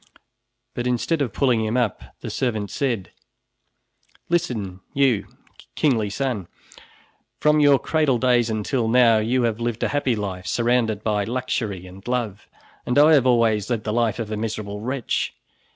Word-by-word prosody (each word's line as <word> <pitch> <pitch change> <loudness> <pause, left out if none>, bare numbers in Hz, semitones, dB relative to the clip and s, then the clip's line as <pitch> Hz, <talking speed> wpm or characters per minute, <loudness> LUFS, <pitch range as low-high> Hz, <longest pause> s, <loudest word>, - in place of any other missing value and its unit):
But 120 0 -3
instead 125 +6 0
of 130 -6 0
pulling 125 -5 +1
him 110 +3 -1
up, 120 -6 0 0.2
the - - -5
servant 110 -6 -2
said: 120 -9 -2 1.2
"Listen, 115 - -1 0.2
you, 135 -6 +2 0.5
kingly 115 -9 +1
son! 120 -5 -2 0.9
From 150 0 +3
your 145 -2 +6
cradle 150 -3 +1
days 120 -1 +2
until 110 +2 -1
now 115 -1 +5
you 120 +4 +1
have 115 -2 0
lived 120 -1 -2
a - - +1
happy 140 -4 0
life, 95 -3 -5
surrounded 115 -3 +1
by 105 -2 0
luxury 110 -5 -3
and 95 +1 -12
love, 115 -5 -3 0.4
and 125 - -1
I 150 +2 +7
have 135 -4 +4
always 115 -4 +2
led 115 -3 -1
the 105 - -2
life 115 -1 +1
of 110 -3 -5
a 110 - -2
miserable 105 -2 -4
wretch. 125 +1 -2
120 Hz, 155 wpm, -23 LUFS, 105-130 Hz, 1.2 s, I